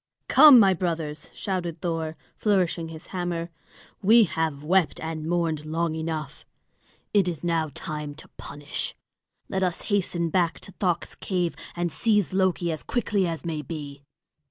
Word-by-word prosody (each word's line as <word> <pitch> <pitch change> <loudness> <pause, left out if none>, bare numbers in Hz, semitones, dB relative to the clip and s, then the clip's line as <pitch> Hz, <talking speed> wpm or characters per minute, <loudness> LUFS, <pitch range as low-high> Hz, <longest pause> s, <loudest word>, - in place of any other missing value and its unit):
"Come, 280 -1 +9
my 195 -3 +6
brothers!" 165 -4 -3
shouted 175 -4 -3
Thor, 160 -2 -2 0.2
flourishing 180 -5 +1
his 160 0 -9
hammer. 175 -2 -2 0.5
"We 225 +4 +7
have 160 -6 -1
wept 180 +1 +2
and 160 -1 -4
mourned 165 -3 0
long 160 +1 -1
enough. 160 -2 -4 0.7
It 200 -3 +4
is 170 -3 -3
now 165 -2 +1
time 150 -2 -5
to 155 - -10
punish. 145 0 -5 0.5
Let 190 - -2
us 180 -2 0
hasten 175 -4 0
back 175 -1 +1
to - - -7
Thökt's 180 -3 -1
cave, 180 -3 -2 0.2
and 175 -1 -1
seize 210 -2 +1
Loki 185 -2 +1
as 155 - -4
quickly 205 -6 0
as 165 0 -4
may 160 -3 -2
be." 145 -1 -7
170 Hz, 150 wpm, -26 LUFS, 160-185 Hz, 0.7 s, Come